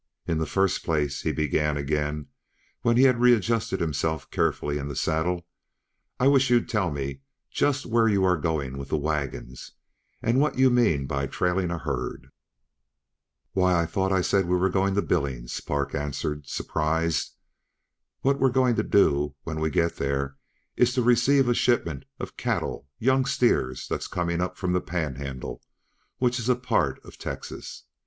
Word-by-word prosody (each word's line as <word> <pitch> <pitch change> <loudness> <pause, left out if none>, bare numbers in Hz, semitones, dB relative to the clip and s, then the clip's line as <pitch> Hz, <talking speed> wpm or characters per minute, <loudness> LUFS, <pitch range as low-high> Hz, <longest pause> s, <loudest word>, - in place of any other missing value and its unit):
"In 80 -1 0
the 80 - -1
first 95 +2 +1
place," 75 -4 0
he - - 0
began 75 0 0
again 75 +1 -1 0.6
when 120 -1 +3
he 130 - +6
had 125 -3 +4
readjusted 115 -4 +3
himself 80 0 -2
carefully 75 0 0
in 70 - -4
the 70 - -5
saddle, 85 +4 0 0.7
"I 130 - +4
wish 140 -2 +4
you'd 120 -1 +3
tell 105 -6 0
me 70 - -4 0.3
just 145 -1 +1
where 115 -1 +3
you 100 -3 +2
are 90 -1 +4
going 70 -4 -2
with 70 0 -7
the - - +1
wagons, 70 -4 -4 0.5
and 120 +3 +1
what 150 -1 +1
you 130 0 +5
mean 105 - +3
by 70 +1 -2
trailing 90 +3 0
a 85 - -2
herd." 80 - -4 1.2
"Why, 90 -2 +3
I 85 - +2
thought 95 +3 -1
I 95 -1 +3
said 95 0 +1
we 90 +1 +2
were 95 +1 +1
going 95 +1 +1
to 100 - +2
Billings," 65 -7 -2
Park 70 -1 -2
answered, 75 0 -3
surprised. 80 -1 -1 0.9
"What 140 +1 +2
we're 135 - +4
going 125 -1 +3
to - - +2
do 75 -7 +2
when 80 -1 -4
we 80 0 +1
get 85 +3 0
there 70 0 -1 0.4
is 125 0 +3
to 125 - +2
receive 125 +3 +4
a 120 - +4
shipment 110 - +1
of - - -7
cattle 70 - -2
young 130 +2 +2
steer 120 - +2
that's - - -3
coming 85 0 -1
up 90 - -3
from 90 -1 -1
the 90 - +1
Panhandle 70 -6 -4 0.6
which 125 0 +1
is 115 +2 -2
a 125 - +5
part 85 - 0
uh - - -11
Texas. - - -7
85 Hz, 170 wpm, -26 LUFS, 75-120 Hz, 1.2 s, he